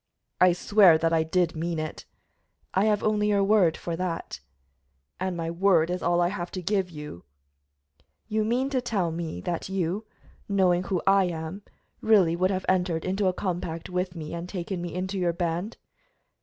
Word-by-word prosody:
"I 180 -1 +6
swear 185 -2 +5
that 165 +1 0
I 165 - +4
did 165 +1 0
mean 165 +1 -2
it." 155 0 -5 0.7
"I 190 +2 +3
have 210 -1 +2
only 210 -1 +2
your 200 -1 +3
word 195 -5 +3
for 170 - -4
that." 180 -2 -4 0.8
"And 185 -1 -2
my 165 0 -3
word 170 -2 +3
is 180 - -2
all 175 0 +2
I 175 - +2
have 175 -3 -4
to 185 - -4
give 190 0 0
you." 150 - -9 1.0
"You 215 0 0
mean 250 +5 0
to 260 -2 +1
tell 200 -8 -1
me 160 - -5
that 175 - -3
you, 190 +3 -2 0.4
knowing 185 -2 +2
who 185 -1 -1
I 195 0 +5
am, 165 +2 -5 0.4
really 195 -7 +4
would 185 +2 +1
have 190 -1 -2
entered 180 -3 +1
into 190 +1 0
a 185 - +2
compact 175 -3 -4
with 180 0 -2
me 155 -1 -6
and 170 +1 -5
taken 180 -1 -4
me 175 -1 -5
into 190 +3 -3
your 175 -2 +1
band?" 175 +5 -3
180 Hz, 185 wpm, -26 LUFS, 170-195 Hz, 1.0 s, I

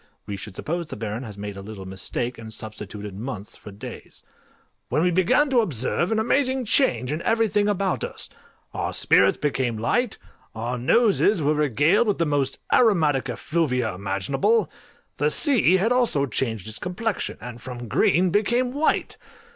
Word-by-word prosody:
[we 100 - -5
should 95 0 -9
suppose 170 +1 -3
the - - -7
Baron 110 +2 -4
has 110 -5 -8
made 105 0 -6
a 100 - -7
little 100 -1 -9
mistake, 115 +6 -4
and 110 -1 -9
substituted 105 -2 -8
months 105 -2 -6
for - - -12
days] 100 +1 -10 0.7
when 155 - +1
we 180 - +3
began 185 - +3
to 250 - +4
observe 170 - 0
an 220 - +1
amazing 260 +3 +1
change 130 - +2
in 155 +2 -2
everything 210 -2 +2
about 195 -2 0
us: - - -6 0.5
our - - -3
spirits 95 0 +4
became 130 -5 -1
light, 220 - 0 0.4
our 120 +3 -3
noses 200 - +3
were 150 0 +2
regaled 150 - +2
with 205 - +1
the 170 - +1
most 145 -3 0 0.2
aromatic 155 - +3
effluvia 125 - -1
imaginable: 100 - 0 0.5
the - - +2
sea 255 - +4
had 215 +6 +1
also 240 - +2
changed 110 -5 -2
its 110 - -3
complexion, 195 +4 -3
and 120 -1 -9
from 120 -1 -7
green 175 - +3
became 240 +6 +1
white!! 300 +3 0
145 Hz, 165 wpm, -24 LUFS, -, 0.7 s, to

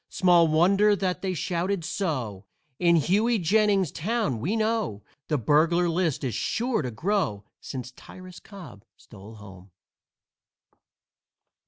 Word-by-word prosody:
Small 175 -3 +4
wonder 195 +7 +3
that 185 -2 -2
they 185 -2 -2
shouted 175 +1 -2
so; 125 - -4 0.3
In 170 -1 +4
Hughey 210 - +2
Jennings's 195 -2 +2
town, 205 - -2
we 180 - -2
know, 220 - -1 0.2
The 150 - 0
burglar 160 +8 +2
list 165 -4 -1
is 125 -4 -2
sure 235 - -1
to 125 - -4
grow 120 - -2
Since 125 -1 -7
Tyrus 185 +7 -13
Cobb 185 - -13
stole 105 +1 -14
home. 95 -3 -14
170 Hz, 125 wpm, -25 LUFS, 130-200 Hz, 0.3 s, Small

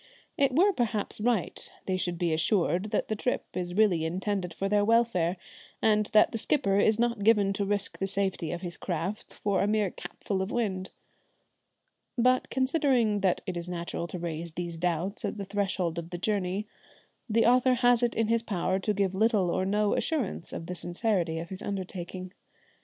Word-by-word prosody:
It 270 -2 +2
were 390 +6 +5
perhaps 220 - -1
right 225 -5 -1 0.2
they 190 - 0
should 180 -2 -2
be 170 -1 0
assured 175 +2 +1
that 215 - -1
the 215 - -1
trip 250 +4 -1
is 180 -1 -3
really 195 -6 +3
intended 185 +2 -2
for 195 +4 -2
their 205 0 +3
welfare, 205 -6 +2 0.4
and 215 -1 +3
that 215 - +5
the 225 - -2
skipper 200 -7 +2
is 215 +1 +4
not 235 -3 0
given 205 -2 +4
to 200 +1 -1
risk 200 0 -1
the 195 - 0
safety 190 -4 -1
of 175 - -4
his 175 -1 -5
craft 180 +4 -4
for 200 -2 0
a 200 - +2
mere 210 -3 +1
capful 195 -2 -4
of 190 - -2
wind. 190 -6 -1 1.3
But 255 +1 +3
conceding 260 -6 +2
that 190 -2 +1
it 185 -3 -4
is 175 +1 -5
natural 170 -1 -4
to 180 - -6
raise 170 -1 -4
these 170 0 -4
doubts 175 +4 -2
at - - -3
the 200 - -4
threshold 190 -4 -1
of 170 0 -7
the 175 - -5
journey, 195 +1 -1 0.6
the 225 +1 +3
author 250 +1 +5
has 245 -1 +4
it 240 -1 +1
in 225 -1 +1
his 230 0 +2
power 190 -4 -1
to 210 +2 -1
give 195 -2 +1
little 205 -3 +2
or 185 - 0
no 210 +1 +2
assurance 270 - -1
of 165 - -6
the 180 - -5
sincerity 175 -1 -1
of 170 +1 -5
his 190 0 -7
undertaking. 185 -1 -5
195 Hz, 190 wpm, -28 LUFS, 180-220 Hz, 1.3 s, were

